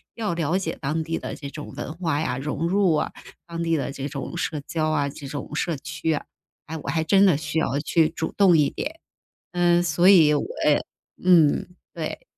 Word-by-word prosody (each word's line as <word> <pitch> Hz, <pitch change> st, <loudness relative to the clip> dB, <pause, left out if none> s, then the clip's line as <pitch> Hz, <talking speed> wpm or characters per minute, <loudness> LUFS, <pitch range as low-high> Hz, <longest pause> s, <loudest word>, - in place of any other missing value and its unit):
要 210 Hz, -6 st, -2 dB
了 165 Hz, +2 st, 0 dB
解 165 Hz, -4 st, -3 dB
当 155 Hz, +3 st, -1 dB
地 165 Hz, 0 st, -2 dB
的 -, -, -6 dB
这 140 Hz, -2 st, -7 dB
种 150 Hz, +1 st, -8 dB
文 155 Hz, -, -5 dB
化 165 Hz, -4 st, -1 dB
呀， 125 Hz, -5 st, -1 dB
融 150 Hz, +4 st, -2 dB
入 185 Hz, -3 st, +3 dB
啊， -, -, -1 dB, 0.4 s
当 170 Hz, 0 st, -4 dB
地 165 Hz, -1 st, +1 dB
的 140 Hz, -, -3 dB
这 140 Hz, 0 st, -4 dB
种 140 Hz, -4 st, -6 dB
社 150 Hz, -3 st, -2 dB
交 155 Hz, -1 st, 0 dB
啊， 145 Hz, -2 st, +1 dB
这 140 Hz, 0 st, -10 dB
种 145 Hz, +2 st, -6 dB
社 165 Hz, -2 st, -1 dB
区 160 Hz, +2 st, -3 dB
啊， 145 Hz, -, -3 dB, 0.4 s
哎， 160 Hz, -, -6 dB
我 140 Hz, -, -6 dB
还 160 Hz, +2 st, +1 dB
真 195 Hz, +4 st, +5 dB
的 170 Hz, -7 st, +4 dB
需 160 Hz, +1 st, -2 dB
要 140 Hz, -2 st, 0 dB
去 160 Hz, +1 st, +2 dB
主 160 Hz, -1 st, -4 dB
动 185 Hz, -5 st, +6 dB
一 145 Hz, -2 st, +3 dB
点， 320 Hz, +2 st, -5 dB, 0.5 s
嗯， 175 Hz, 0 st, +3 dB
所 175 Hz, +2 st, +3 dB
以 160 Hz, -6 st, +7 dB
我 145 Hz, -, +1 dB, 0.2 s
呃， 150 Hz, -, +5 dB, 0.5 s
嗯， 165 Hz, -5 st, +5 dB, 0.3 s
对。 160 Hz, -2 st, -5 dB
160 Hz, 225 characters per minute, -24 LUFS, 150-175 Hz, 0.5 s, 以